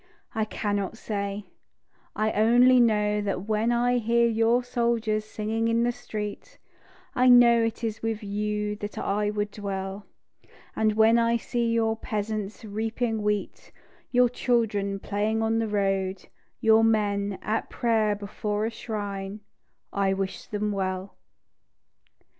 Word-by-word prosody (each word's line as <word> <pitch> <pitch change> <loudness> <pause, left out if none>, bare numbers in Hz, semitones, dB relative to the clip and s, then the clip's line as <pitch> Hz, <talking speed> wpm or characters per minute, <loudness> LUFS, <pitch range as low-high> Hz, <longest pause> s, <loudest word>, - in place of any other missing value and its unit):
I 220 -1 0
cannot 205 -1 -2
say, 200 -1 -4 0.7
I 215 0 +1
only 245 +4 +5
know 210 -3 +2
that 195 -2 -2
when 220 +2 +1
I 245 +1 +2
hear 235 +1 +3
your 230 +2 +2
soldiers 235 -3 0
singing 220 +1 -2
in 230 +1 +2
the 240 - +2
street, 215 -4 -7 0.6
I 255 0 +4
know 240 -1 +7
it 225 +1 -3
is 220 -2 -3
with 225 -1 -2
you 210 +1 -2
that 205 0 -7
I 205 +1 0
would 210 0 -2
dwell; 195 -1 -5 0.7
And 215 -1 +2
when 220 +2 +5
I 230 0 +2
see 235 0 -1
your 225 -1 +1
peasants 215 -2 -4
reaping 220 +2 -2
wheat, 210 -1 -3 0.4
Your 250 0 +4
children 215 -5 0
playing 210 +3 -1
on 225 0 +1
the 225 - 0
road, 195 -2 -1 0.3
your 225 0 +5
men 205 -3 +1
At 220 +2 -2
prayer 220 -3 +1
before 210 +1 -3
a 225 - -2
shrine, 205 -3 -5 0.5
I 195 -1 +1
wish 195 0 -4
them 210 0 -2
well. 190 -1 -3
215 Hz, 135 wpm, -26 LUFS, 205-230 Hz, 0.7 s, know